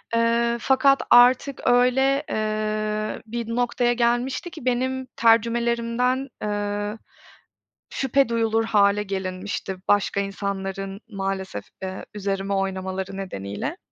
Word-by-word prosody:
Iıı, 235 Hz, +1 st, +2 dB
fakat 275 Hz, +1 st, +4 dB
artık, 255 Hz, +3 st, +5 dB
öyle, 265 Hz, +3 st, +3 dB
ııı, 215 Hz, 0 st, -2 dB
bir 230 Hz, +1 st, -4 dB
noktaya 245 Hz, 0 st, +1 dB
gelmişti 240 Hz, +7 st, 0 dB
ki, 310 Hz, -7 st, -10 dB
benim 260 Hz, +1 st, 0 dB
tercümelerimden, 235 Hz, +3 st, +2 dB
ııı, 205 Hz, 0 st, -2 dB, 0.9 s
şüphe 270 Hz, -1 st, +1 dB
duyulur 225 Hz, -1 st, +1 dB
hâle 205 Hz, -1 st, +3 dB
gelinmişti, 190 Hz, 0 st, -4 dB
başka 205 Hz, -1 st, +2 dB
insanların 195 Hz, 0 st, -4 dB
maalesef, 195 Hz, -, -4 dB, 0.2 s
ııı, 190 Hz, 0 st, -5 dB
üzerime 195 Hz, -1 st, -2 dB
oynamaları 190 Hz, 0 st, -3 dB
nedeniyle. 190 Hz, -, -5 dB
215 Hz, 100 wpm, -24 LUFS, 195-245 Hz, 0.9 s, artık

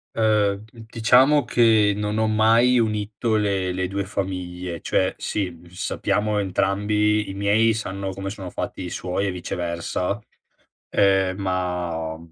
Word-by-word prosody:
Ehm, 105 Hz, -2 st, +2 dB
d 110 Hz, 0 st, -14 dB
diciamo 130 Hz, +6 st, +4 dB
che 110 Hz, -3 st, +4 dB
non 105 Hz, +1 st, -2 dB
ho 110 Hz, -, +2 dB
mai 115 Hz, +3 st, +4 dB
unito 110 Hz, 0 st, -1 dB
le 100 Hz, -3 st, 0 dB
le 90 Hz, 0 st, -2 dB
2 100 Hz, +1 st, -3 dB
famiglie, 90 Hz, -3 st, -4 dB
cioè, 95 Hz, -, +1 dB
sì, 90 Hz, -5 st, -3 dB
sappiamo 105 Hz, +3 st, -1 dB
entrambi 105 Hz, +2 st, +1 dB
i -, -, -5 dB
miei 105 Hz, +3 st, +3 dB
sanno 100 Hz, -3 st, -4 dB
come 95 Hz, +1 st, -5 dB
sono 95 Hz, -3 st, -7 dB
fatti -, -, -5 dB
i -, -, -5 dB
suoi 90 Hz, +3 st, -2 dB
e -, -, -1 dB
viceversa, 90 Hz, +2 st, -3 dB, 0.7 s
ehm, 95 Hz, -2 st, +2 dB
ma 90 Hz, -4 st, -2 dB
100 Hz, 135 wpm, -23 LUFS, 95-110 Hz, 0.7 s, diciamo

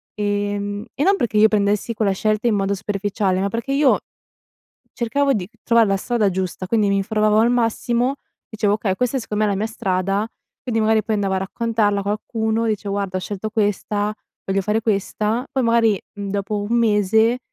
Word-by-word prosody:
ehm, 205 Hz, 0 st, -2 dB
e 285 Hz, -, -1 dB
non 390 Hz, +4 st, +4 dB
perché 225 Hz, -, -1 dB
io 215 Hz, -, +7 dB
prendessi 210 Hz, +1 st, +1 dB
quella 210 Hz, -2 st, +1 dB
scelta 215 Hz, +4 st, 0 dB
in 225 Hz, -, +3 dB
modo 200 Hz, 0 st, 0 dB
superficiale, 200 Hz, -1 st, -1 dB
ma 200 Hz, +1 st, 0 dB
perché 235 Hz, +5 st, -3 dB
io 280 Hz, -1 st, +4 dB, 0.9 s
cercavo 275 Hz, +4 st, +1 dB
di 185 Hz, -6 st, -2 dB, 0.2 s
trovar 230 Hz, -1 st, +4 dB
la 195 Hz, -, +2 dB
strada 220 Hz, 0 st, +1 dB
giusta, 185 Hz, 0 st, -3 dB
quindi 210 Hz, 0 st, +2 dB
m'informavo 210 Hz, +2 st, +2 dB
al 230 Hz, +2 st, +4 dB
massimo, 240 Hz, +2 st, +1 dB, 0.3 s
dicevo: 215 Hz, -3 st, 0 dB
"Okay 205 Hz, -3 st, -1 dB
questa 250 Hz, +5 st, 0 dB
secondo 215 Hz, -2 st, -1 dB
me 210 Hz, -, +1 dB
è -, -, +1 dB
la -, -, -2 dB
mia 215 Hz, -, 0 dB
strada." 195 Hz, -1 st, -1 dB, 0.3 s
Quindi 225 Hz, -3 st, -1 dB
magari 220 Hz, 0 st, +3 dB
poi 220 Hz, +1 st, -1 dB
andavo 200 Hz, -2 st, 0 dB
a -, -, +1 dB
raccontarla 210 Hz, +1 st, 0 dB
a -, -, -7 dB
qualcuno, 220 Hz, +2 st, -1 dB
dicevo: 205 Hz, -2 st, -2 dB
"Guarda 195 Hz, -2 st, -2 dB
ho -, -, -2 dB
scelto 205 Hz, +3 st, -4 dB
questa, 210 Hz, -1 st, -1 dB, 0.3 s
voglio 195 Hz, 0 st, 0 dB
fare 210 Hz, +3 st, 0 dB
questa." 215 Hz, +3 st, -1 dB
Poi 265 Hz, -, 0 dB
magari, 230 Hz, -3 st, +3 dB
mhmm, 200 Hz, -1 st, -5 dB
dopo 205 Hz, +1 st, -2 dB
1 225 Hz, +4 st, 0 dB
mese, 220 Hz, +1 st, +3 dB
210 Hz, 190 wpm, -21 LUFS, 200-230 Hz, 0.9 s, io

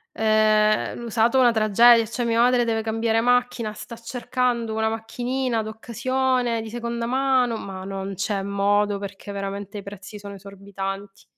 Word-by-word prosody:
Ehm, 215 Hz, -1 st, +3 dB
l'usato 235 Hz, +2 st, +2 dB
una 245 Hz, -2 st, +6 dB
tragedia, 230 Hz, +2 st, +5 dB
cioè 235 Hz, +3 st, -3 dB
mia 230 Hz, 0 st, +1 dB
madre 245 Hz, 0 st, +4 dB
deve 225 Hz, -1 st, 0 dB
cambiare 225 Hz, 0 st, 0 dB
macchina, 245 Hz, -2 st, +1 dB
sta 215 Hz, +2 st, -9 dB
cercando 240 Hz, 0 st, -2 dB
una 220 Hz, 0 st, +1 dB
macchinina 240 Hz, +2 st, -2 dB
d'occasione 240 Hz, +2 st, -1 dB
di 220 Hz, -, -7 dB
seconda 235 Hz, 0 st, -4 dB
mano, 255 Hz, -2 st, +1 dB
ma 190 Hz, -3 st, -7 dB
non 195 Hz, 0 st, -5 dB
c'è 195 Hz, +1 st, -1 dB
modo 200 Hz, +1 st, +1 dB
perché 200 Hz, 0 st, -8 dB
veramente 200 Hz, +1 st, -5 dB
i -, -, -10 dB
prezzi 200 Hz, +1 st, -9 dB
sono 200 Hz, 0 st, -9 dB
esorbitanti. 195 Hz, 0 st, -7 dB
220 Hz, 150 wpm, -23 LUFS, 200-240 Hz, -, una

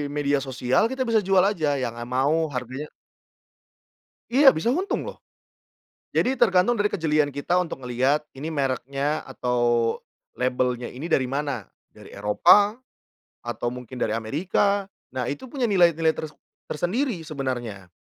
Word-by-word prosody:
media 145 Hz, -1 st, +1 dB
sosial 125 Hz, -1 st, +1 dB
kita 265 Hz, 0 st, -3 dB
bisa 225 Hz, -2 st, +3 dB
jual 190 Hz, -1 st, +5 dB
aja 160 Hz, -7 st, -1 dB, 0.2 s
yang 115 Hz, -1 st, -3 dB
a -, -, -3 dB
mau 130 Hz, +5 st, +1 dB, 0.2 s
harganya 130 Hz, +4 st, -5 dB, 1.4 s
Iya, 270 Hz, +1 st, +7 dB
bisa 230 Hz, +10 st, +1 dB
untung 370 Hz, +8 st, -1 dB
loh. -, -, -8 dB, 1.0 s
Jadi 260 Hz, 0 st, +1 dB
tergantung 195 Hz, 0 st, +4 dB
dari 205 Hz, 0 st, +2 dB
kejelian 155 Hz, -5 st, +1 dB
kita 145 Hz, +6 st, 0 dB
untuk 160 Hz, -7 st, -4 dB
ngelihat 130 Hz, +5 st, +1 dB
ini 145 Hz, +4 st, -5 dB
mereknya 140 Hz, +1 st, -1 dB
atau 120 Hz, -3 st, +1 dB, 0.4 s
labelnya 125 Hz, -1 st, -1 dB
ini 130 Hz, +6 st, -8 dB
dari 130 Hz, -, +2 dB
mana? 140 Hz, -, -3 dB, 0.2 s
Dari -, -, -15 dB
Eropa, 200 Hz, -, +4 dB, 0.7 s
atau 120 Hz, -, -2 dB
mungkin 125 Hz, 0 st, -9 dB
dari 110 Hz, -, -1 dB
Amerika. 185 Hz, -, 0 dB, 0.3 s
Nah 130 Hz, -1 st, -1 dB
itu 260 Hz, -, -7 dB
punya 255 Hz, 0 st, -2 dB
nilai-nilai 170 Hz, -4 st, +4 dB
ters 155 Hz, -1 st, -7 dB, 0.3 s
tersendiri 185 Hz, -, -1 dB
sebenarnya. 120 Hz, -, -4 dB
145 Hz, 135 wpm, -24 LUFS, 125-180 Hz, 1.4 s, Iya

